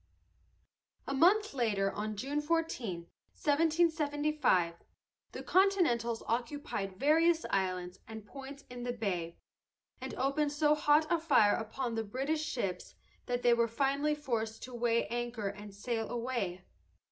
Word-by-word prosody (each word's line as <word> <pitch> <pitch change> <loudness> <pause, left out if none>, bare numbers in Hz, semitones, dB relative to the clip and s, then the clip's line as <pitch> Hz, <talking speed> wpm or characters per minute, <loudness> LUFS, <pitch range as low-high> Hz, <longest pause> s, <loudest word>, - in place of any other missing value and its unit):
A 275 - -3
month 390 +8 +4
later, 205 -6 +1
on 215 +1 -4
June 275 +7 -2
14, 295 - -1 0.3
1775, 300 - +2 0.6
the - - -7
Continentals 330 - +2
occupied 230 -6 -3
various 325 +3 +4
islands 185 -2 -1
and 220 -1 -8
points 275 +4 -10
in 245 0 -8
the 245 0 -2
bay, 180 -7 -3 0.6
and - - -5
opened 285 +2 0
so 300 0 +3
hot 300 +1 +4
a 340 - +3
fire 275 -11 +4
upon 230 +2 -3
the 225 0 -1
British 270 +8 -2
ships 200 - -3 0.3
that 245 0 -1
they 240 - +6
were 235 0 +3
finally 280 +5 +1
forced 230 -6 -3
to 255 - -8
weigh 235 -1 +1
anchor 240 -3 -2
and 205 +1 -9
sail 225 +2 -3
away. 235 -7 -3
245 Hz, 135 wpm, -32 LUFS, 220-295 Hz, 0.6 s, they